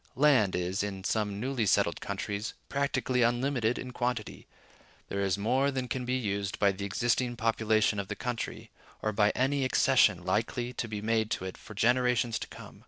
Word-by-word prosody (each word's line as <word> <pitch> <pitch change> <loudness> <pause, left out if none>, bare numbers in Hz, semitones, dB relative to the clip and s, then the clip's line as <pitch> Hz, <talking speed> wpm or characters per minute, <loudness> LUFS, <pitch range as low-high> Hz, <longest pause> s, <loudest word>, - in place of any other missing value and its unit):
Land 130 -8 +4
is, 90 +2 -1
in 95 -2 -4
some 105 -1 -1
newly 125 -2 -1
settled - - +2
countries, 105 +2 -4
practically 135 -2 0
unlimited 120 0 +1
in 130 - -6
quantity: 125 -3 -3 0.6
there 100 - -2
is 95 -1 +1
more 130 +7 +2
than 130 -2 -2
can 125 +1 -3
be 125 +1 0
used 100 -5 -2
by 100 -1 +4
the 100 +1 -5
existing 120 +4 0
population 110 -2 +2
of 100 - -3
the - - -4
country, 120 -2 -4 0.3
or 110 - +1
by 105 0 +3
any 135 +2 +1
accession 130 -8 +3
likely 115 +5 -1
to 120 - -3
be 105 -1 -5
made 110 -1 +1
to 95 - -2
it 95 - -5
for 110 - -12
generations 120 +1 +2
to - - -6
come. - - -12
115 Hz, 180 wpm, -30 LUFS, 100-125 Hz, 0.6 s, Land